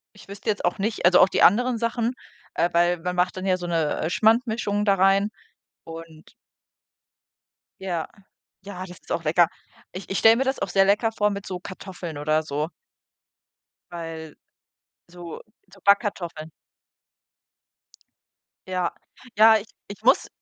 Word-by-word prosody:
ich 205 - -16
wüsste 200 +2 -6
jetzt 205 - -1
auch 175 - 0
nicht 215 0 -2
also, 180 +1 +6
auch - - +7
die - - 0
anderen 245 +5 +4
Sachen, 230 +1 -1 0.4
äh, 170 - +1
weil 175 +1 +2
man 180 +2 -3
macht 180 +1 +1
dann 185 - -5
ja 185 -1 +2
so 175 -1 -6
'ne, 165 -3 -1
äh, 160 - -1
Schmandmischung 220 0 +1
da 200 -2 +4
rein 195 +2 +3 0.6
und 165 -1 -11 1.5
Ja. 175 -4 -3 0.6
Ja, 195 -2 -8
das 180 -1 -12
ist - - -14
auch 165 - -1
lecker. 165 +2 +4 0.4
Ich 185 +2 -9
ich 195 - -1
stelle 225 +1 +6
mir 265 - +1
das 265 0 -1
auch - - -2
sehr 195 +1 +4
lecker 210 +3 +2
vor 210 -2 +1
mit 200 0 -6
so 180 -1 -5
Kartoffeln 180 -4 -8
oder 155 +2 0
so. 150 +1 -3 1.2
Weil 165 -2 -7 0.7
so 175 -1 -10 0.3
so 195 - -16
Backkartoffeln. 185 -6 +1 2.2
Ja. 180 -2 -2 0.4
Ja, 220 +1 +7
ich 215 +1 -8 0.2
ich 200 - -10
muss - - +4
185 Hz, 155 wpm, -24 LUFS, 170-205 Hz, 2.2 s, auch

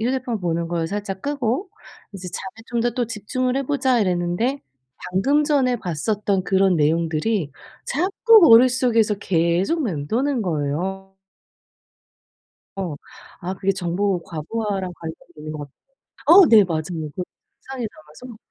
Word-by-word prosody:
휴대폰 240 -2 -2
보는 170 -1 -2
걸 170 -1 -1
살짝 195 0 -5
끄고 280 - -2 0.4
'이제 185 -2 -7
잠에 190 +5 -8
좀 235 -1 -2
더 240 +1 +1
또 245 0 -2
집중을 250 +4 -2
해 275 - 0
보자.' 265 -3 +1
이랬는데 185 +8 0 0.5
방금 275 +11 +2
전에 265 -5 +2
봤었던 195 +2 -1
그런 190 -2 +3
내용들이 160 +3 0 0.4
자꾸 400 - +4
머릿속에서 235 -2 +5
계속 185 - 0
맴도는 230 - -1
거예요. 180 +4 -3 1.6
어. 180 -6 -3 0.5
아 185 +2 -4
그게 195 0 0
정보 185 0 -1
과부하랑 190 +3 -4
관련이 165 -1 -7 0.2
있는 155 0 -7
것 155 - -6
같아요. 145 -2 -9 0.5
어 355 +2 +9
네 215 -3 +7
맞아요. 160 -3 -2 0.3
그 185 - -3 0.4
잔상이 260 -3 -5
남아서 185 +11 -13
200 Hz, 280 characters per minute, -22 LUFS, 175-250 Hz, 1.6 s, 어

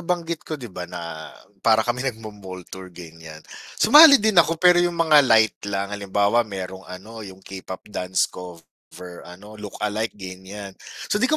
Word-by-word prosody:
nabanggit 170 -2 -3
ko 155 - -3
'di 120 -8 -11
ba 90 -1 -7
na, 85 -3 -8 0.3
para 110 -1 +3
kami 120 +1 -2
nagmo-mall 105 -6 -9
tour 95 -1 -9
ganiyan. 80 -3 -13 0.3
Sumali 295 +5 +8
din 220 -3 +1
ako 165 +1 0
pero 180 +1 +5
yung 175 -1 -1
mga 160 -3 +5
light 110 -2 +3
lang, 100 0 -3
halimbawa 100 +2 +1
mayrong 95 -4 -6
ano 105 +5 -10
yung 95 -2 -12
K-pop 95 -1 -9
dance 90 -2 0
cover 90 0 -12
ano 105 +4 -13
look-alike, 105 +1 -4
ganiyan. 95 +1 -9 0.4
So, 210 - +1
'di 260 - +2
ko 310 - +2
105 Hz, 165 wpm, -22 LUFS, 95-125 Hz, 0.4 s, Sumali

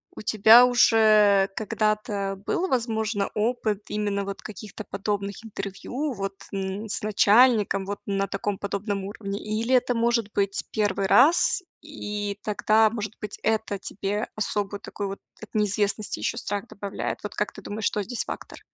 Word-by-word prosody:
у - - -7
тебя 220 +3 +7
уже 215 -5 +5
когда-то 210 -2 -1
был, 370 +2 0
возможно, 220 - 0
опыт 215 -2 0
именно 205 -1 -1
вот 195 0 -6
каких-то 210 +1 -8
подобных 200 +1 -3
интервью, 245 +7 -4
вот, 195 -1 -4 0.2
н 195 +2 -4
с - - -3
начальником, 210 -1 +4
вот, 205 +1 -4
на 195 0 0
таком 195 +1 -2
подобном 200 0 -3
уровне, 200 0 -5
или 225 +4 0
это, 250 0 +2
может 230 -2 +1
быть, 200 -1 0
1 205 -2 0
раз, 310 - +5 0.2
и 205 -9 -5
тогда, 215 +1 +3
может 215 -1 -4
быть, 210 -1 -6
это 220 -2 0
тебе 200 +2 -3
особую 205 -1 -2
такую, 200 -2 -5
вот, 195 - -6 0.2
от 220 - -9
неизвестности 210 0 0
ещё 230 - -2
страх 205 0 -3
добавляет? 200 -1 -4
Вот 210 - -6
как 210 - -1
ты 200 - -10
думаешь, 210 +2 -5
что 210 - +1
здесь 235 +4 -4
фактор? - - -7
210 Hz, 155 wpm, -25 LUFS, 200-220 Hz, 0.2 s, тебя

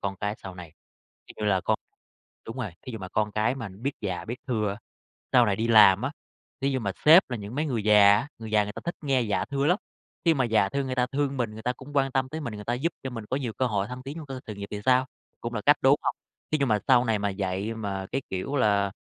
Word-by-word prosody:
con 100 0 -3
cái 105 +2 -2
sau 95 -2 -9
này. 85 -3 -10 0.5
Thí - - -13
dụ 105 - -4
như 105 - +3
là 95 -1 +2
con - - 0 0.7
đúng 115 - -7
rồi, 115 -6 -3 0.2
thí 125 - -5
dụ 110 - -5
mà 95 - -7
con 105 +2 -1
cái 110 +4 +1
mà 115 -6 -6
nó 95 0 -14
biết 135 +6 -2
dạ, 90 -4 -3
biết 120 +2 -5
thưa, 105 -4 0 0.6
sau 125 -2 +6
này 100 -2 +1
đi 115 +3 -1
làm 105 -3 +7
á, 135 +4 -2 0.5
thí 135 +1 +1
dụ 130 -1 -1
mà 100 -4 -2
sếp 160 +1 +7
là 120 - -2
những 105 +2 -7
mấy 150 +3 0
người 120 -7 -1
già 105 -1 +7
á, 135 +7 -2
người 110 -1 -7
già 105 -1 +4
người 105 - -6
ta - - -8
thích 170 - -3
nghe 135 -3 +2
dạ 105 -3 0
thưa 140 0 -1
lắm. 180 +5 +3 0.5
Khi 165 - +5
mà 130 -3 +1
dạ 110 -5 +3
thưa 140 +5 -2
người 130 -1 -3
ta 125 -1 +2
thương 140 -1 0
mình, 120 -3 -1
người 110 +1 -9
ta 125 - 0
cũng 130 +3 -12
quan 135 -1 +2
tâm 130 -1 +1
tới 155 +3 -5
mình, 120 -8 -5
người 105 0 -8
ta 120 - -1
giúp 160 +7 -1
cho 130 - -4
mình 115 -3 -6
có 130 - +1
nhiều 125 -5 -3
cơ 130 - 0
hội 100 -4 0
thăng 125 +2 -7
tiến 140 +4 -7
trong 160 -3 -7
cơ 135 -2 -6
sự 105 - -6
nghiệp 100 0 -7
thì 105 - -4
sao? 130 0 +4 0.3
Cũng 120 0 -5
là 105 - -1
cách, 145 +1 +7
đúng 135 +1 +6
hông? - - 0 0.4
Thí 155 - +3
dụ 140 - +2
mà 110 -4 +2
sau 125 -2 +6
này 110 -3 +1
mà 100 0 -1
dạy 95 +3 -2
mà, 100 -3 -4
cái 135 - -1
kiểu 95 +10 -3
là, 100 -5 +2
115 Hz, 295 wpm, -27 LUFS, 105-135 Hz, 0.7 s, làm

